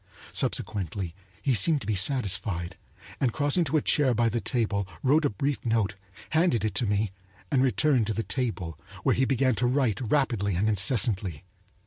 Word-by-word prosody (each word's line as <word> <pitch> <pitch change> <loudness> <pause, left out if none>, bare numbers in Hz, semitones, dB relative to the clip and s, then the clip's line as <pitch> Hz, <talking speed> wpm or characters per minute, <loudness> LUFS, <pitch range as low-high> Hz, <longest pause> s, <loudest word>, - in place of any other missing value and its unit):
Subsequently 95 -3 -2 0.3
he 135 - +2
seemed 145 - +3
to - - -7
be 110 - 0
satisfied, 95 -5 +1 0.4
and 130 -4 +1
crossing 145 +6 +1
to 155 +2 +1
a 150 - 0
chair 135 -5 +2
by 115 0 +2
the 115 +1 -2
table 100 -3 -1 0.2
wrote 150 +4 +3
a - - +3
brief 135 +4 -2
note, 110 -5 0 0.4
handed 155 -9 +2
it 105 - -1
to 110 +4 0
me, 100 0 0 0.4
and 135 -3 +3
returned 130 -1 +2
to 110 - -1
the 115 - -1
table, 105 - -3 0.2
where - - +3
he 130 - +2
began 130 -1 +2
to 125 +2 0
write 125 -5 +1
rapidly 115 -10 +1
and 100 +5 +1
incessantly. 100 - +2
115 Hz, 175 wpm, -27 LUFS, 100-135 Hz, 0.4 s, seemed